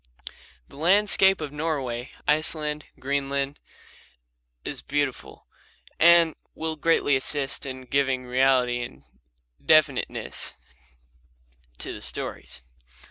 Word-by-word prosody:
The - - -16
landscape 195 +2 +4
of 150 -2 -4
Norway, 140 -6 -3 0.2
Iceland, 150 0 0
and - - -23
Greenland 140 +1 -1 1.1
is - - -5
wonderful 145 -3 -2 0.5
and 170 -1 +6 0.2
will 160 0 -3
greatly 150 -2 +2
assist 135 +1 -2
in 130 -1 -6
giving 130 -1 0
reality 125 -1 +2
and 70 - -8 0.6
definiteness 155 -4 +2 1.2
to - - -5
the - - -9
stories. 60 - -6
140 Hz, 95 wpm, -25 LUFS, 130-155 Hz, 1.2 s, and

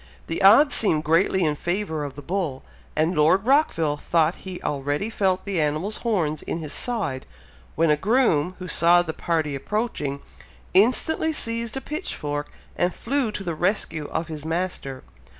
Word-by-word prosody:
The 165 - -3
odds 225 +10 +7
seemed 160 -8 +4
greatly 170 +4 +2
in 155 -2 +2
favour 175 0 -2
of 140 -2 -6
the 145 - -9
bull, 165 -5 -3 0.3
and 160 +3 +1
Lord 165 +7 +3
Rockville 170 - +2
thought 165 +2 +1 0.2
he 180 - -6
already 145 +9 -2
felt 190 -3 0
the 195 -5 0
animal's 155 +8 -1
horns 170 -10 -1
in - - -4
his 155 -3 -5
side, 190 - -3 0.5
when 165 -1 +3
a - - +5
groom, 185 - +2
who 185 - -7
saw 175 0 +4
the 160 -2 -4
party 160 -4 -1
approaching, 145 - -3 0.5
instantly 255 +10 +3
seized 230 -2 -2
a - - -4
pitchfork 150 - -4 0.3
and 175 +1 0
flew 260 -2 -1
to 205 - -5
the 170 -3 -3
rescue 165 -3 -1
of 165 - -3
his 155 -3 -7
master. 160 -5 -3
175 Hz, 165 wpm, -24 LUFS, 150-210 Hz, 0.5 s, odds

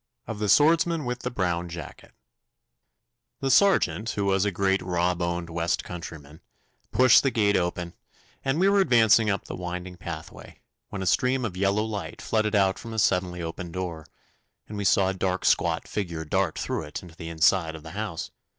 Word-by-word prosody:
Of 110 - -6
the 105 -1 -1
Swordsman 165 - +4
with 125 0 -3
the 125 - -3
Brown 90 -6 -2
Jacket 85 0 -10 1.2
The 135 -1 0
sergeant, 130 - +3
who 100 -2 -2
was 95 0 +2
a 105 - +1
great 95 +1 +1
raw 90 0 0
boned 85 -1 -3
west 85 0 -1
countryman, 80 -3 -9 0.5
pushed 125 +1 +6
the 135 - +2
gate 105 -4 +2
open, 85 -1 -1 0.5
and 135 +4 0
we 190 - +4
were 200 0 +4
advancing 115 - +5
up 100 -3 -1
the - - -6
winding 90 0 -6
pathway, 80 -2 -9 0.3
when 100 -2 -5
a - - -4
stream 125 +6 +2
of 95 -5 -4
yellow 100 +3 +1
light 110 -2 -5
flooded 110 -1 0
out 95 -1 +2
from 115 -1 -8
a - - -5
suddenly 90 -4 +1
opened 85 +1 -6
door, 85 -4 -5 0.6
and 105 - -8
we 100 -1 -3
saw 95 0 +4
a - - -1
dark 95 -1 -2
squat 85 -1 +2
figure 85 -6 -4
dart 90 +1 0
through - - -2
it 75 +2 -7
into 85 -2 -13
the 80 -1 -7
inside 80 0 +2
of 80 - -10
the 80 - -9
house. 100 -3 -5
95 Hz, 185 wpm, -26 LUFS, 85-110 Hz, 1.2 s, pushed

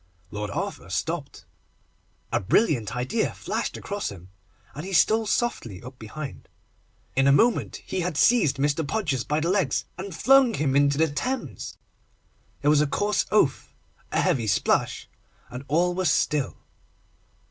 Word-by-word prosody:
Lord 105 0 -4
Arthur 90 - -4
stopped. 145 - -4 0.9
A - - +3
brilliant 115 - +1
idea 130 - -1
flashed - - -3
across 205 0 -4
him, 90 -1 -11 0.4
and 150 - -7
he 190 +1 -6
stole 220 +5 +4
softly 120 - -2
up 125 +1 -11
behind. 135 +6 -8 0.7
In 135 +1 +3
a - - +6
moment 230 - +2
he 190 - -3
had 175 -3 -2
seized 160 - +4
Mr. 145 +3 +1
Podgers 150 - -1
by 150 +1 0
the 165 +3 0
legs, 195 -2 +1
and 190 -2 -6
flung 265 0 +5
him 140 -3 0
into 140 0 +3
the 160 +1 +4
Thames. 255 - -4 0.8
There 145 0 +4
was 150 -1 +4
a 150 - +2
coarse 205 +7 0
oath, 210 - +1 0.4
a - - +1
heavy 135 -12 +1
splash, 100 - +1 0.4
and 125 +2 -7
all 175 +4 +2
was 185 -2 +1
still. 145 -2 0
150 Hz, 150 wpm, -25 LUFS, 130-195 Hz, 0.9 s, a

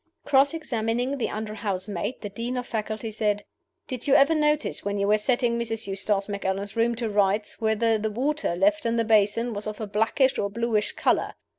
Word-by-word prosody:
Cross 280 +2 +4
examining 245 -2 -2
the - - -1
under 215 0 -4
housemaid, 200 +1 -3
the 205 - -5
Dean 235 +5 -4
of 250 - -3
Faculty 220 0 -4
said: 210 -1 -1 0.4
"Did 255 0 -5
you 280 - +5
ever 285 +3 +6
notice 300 -1 0
when 205 0 -2
you 200 0 0
were 210 +1 +4
setting 240 +1 +1
Mrs. 225 -1 -2
Eustace 195 0 0
Macallan's 200 0 -3
room 230 +1 +2
to 230 0 -2
rights 205 +1 0
whether 220 0 +2
the 220 +1 -1
water 265 - -1
left 205 +4 +2
in 230 - 0
the 230 -1 +1
basin 220 +2 +2
was 205 +1 -3
of 210 -1 -5
a 220 - -3
blackish 225 +6 +1
or 200 - 0
bluish 220 0 0
color?" - - 0
220 Hz, 195 wpm, -25 LUFS, 205-240 Hz, 0.4 s, ever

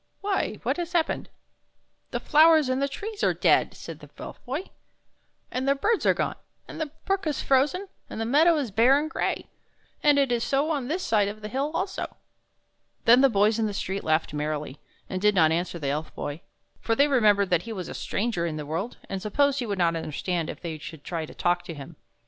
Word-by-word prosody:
" - - -47
" - - -46
Why, 395 -1 0
what - - 0
has 345 0 -4
happened? 335 -2 0 0.3
" - - -46
" - - -47
The - - -2
flowers 315 -2 +5
and 270 +2 0
trees 420 +8 -6
are - - +3
dead," - - +3
said - - -9
the - - -13
Elf - - -9
Boy, 280 +9 -4 0.4
" - - -44
and 255 +2 -2
the 275 - +4
birds 420 +10 +1
are - - +6
gone, - - -2 0.3
and - - -7
the 315 - -1 0.2
brook 390 -3 0
is 295 - -1
frozen, 295 +9 +2 0.2
and - - -6
the 225 - -1
meadow 310 +8 +5
is 270 -7 -2
bare 235 +7 +5
and 300 +2 -1
gray. 320 - -2 0.6
And 295 -1 +5
it 275 -3 +2
is 240 -1 +1
so 285 +3 +1
on 280 -5 -1
this 350 +6 -2
side 210 -3 +2
of 210 +1 -6
the 210 - -5
hill 270 +5 -1
also." 380 0 -3 0.9
Then 240 +3 +7
the 275 - +6
boys 210 0 +3
in 220 - +1
the 205 - -4
street 195 0 -3
laughed 155 -1 +1
merrily, 150 -1 -3 0.3
and 185 -1 -4
did 210 0 +4
not 160 -3 +5
answer 175 +1 -1
the 145 -4 -3
Elf 150 +3 -3
Boy, 145 +3 -5 0.4
for 225 - 0
they 280 +4 +4
remembered 210 -8 +3
that 175 -2 +3
he - - -4
was 185 -5 -5
a - - -6
stranger 200 -6 -1
in 160 - -3
the 150 - -5
world, 165 +10 -4
and 195 -1 -4
supposed 280 +7 +2
he 245 - -3
would 200 -2 -2
not 170 -2 +2
understand 165 +1 -2
if - - -7
they 160 -3 -5
should 150 -1 -9
try 165 -3 -4
to - - -12
talk 175 0 +1
to 170 -2 -6
him. 145 +3 -10
225 Hz, 235 wpm, -26 LUFS, 175-285 Hz, 0.9 s, Then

